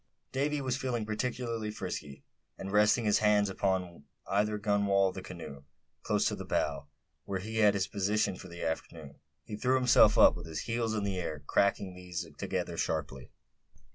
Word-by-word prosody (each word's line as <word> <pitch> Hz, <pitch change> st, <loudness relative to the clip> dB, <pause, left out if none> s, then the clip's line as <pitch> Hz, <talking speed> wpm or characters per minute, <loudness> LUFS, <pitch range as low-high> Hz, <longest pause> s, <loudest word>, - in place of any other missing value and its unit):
Davy 145 Hz, +2 st, 0 dB
was 130 Hz, -2 st, -1 dB
feeling 125 Hz, -5 st, -2 dB
particularly 115 Hz, 0 st, -2 dB
frisky; 75 Hz, -8 st, -6 dB, 0.3 s
and 95 Hz, -, -6 dB
resting 105 Hz, +3 st, +4 dB
his 105 Hz, -, +3 dB
hands, 105 Hz, -1 st, +3 dB
one 95 Hz, -, -6 dB, 0.3 s
upon 85 Hz, -5 st, -14 dB, 0.2 s
either 105 Hz, +2 st, +1 dB
gunwale 100 Hz, -2 st, +2 dB
of -, -, -8 dB
the 95 Hz, -, -6 dB
canoe, 85 Hz, -7 st, -9 dB, 0.4 s
close -, -, +1 dB
to -, -, -1 dB
the -, -, -6 dB
bow, -, -, -1 dB, 0.4 s
where 100 Hz, -, -2 dB
he 110 Hz, +4 st, -5 dB
had 105 Hz, -2 st, +5 dB
his 95 Hz, -2 st, +1 dB
position 100 Hz, 0 st, 0 dB
for 95 Hz, -, -10 dB
the 85 Hz, -1 st, -8 dB
afternoon, 80 Hz, -2 st, -5 dB, 0.3 s
he 105 Hz, -, -6 dB
threw 125 Hz, +4 st, +1 dB
himself 125 Hz, -4 st, +5 dB
up, -, -, +7 dB
with 85 Hz, -2 st, -8 dB
his 80 Hz, -1 st, -4 dB
heels 115 Hz, -1 st, -1 dB
in 105 Hz, -, -1 dB
the 95 Hz, -2 st, -1 dB
air, 75 Hz, -4 st, -4 dB
cracking 100 Hz, +1 st, +1 dB
these 90 Hz, -1 st, -5 dB
together -, -, -3 dB
sharply. -, -, -3 dB
100 Hz, 180 wpm, -31 LUFS, 90-110 Hz, 0.4 s, up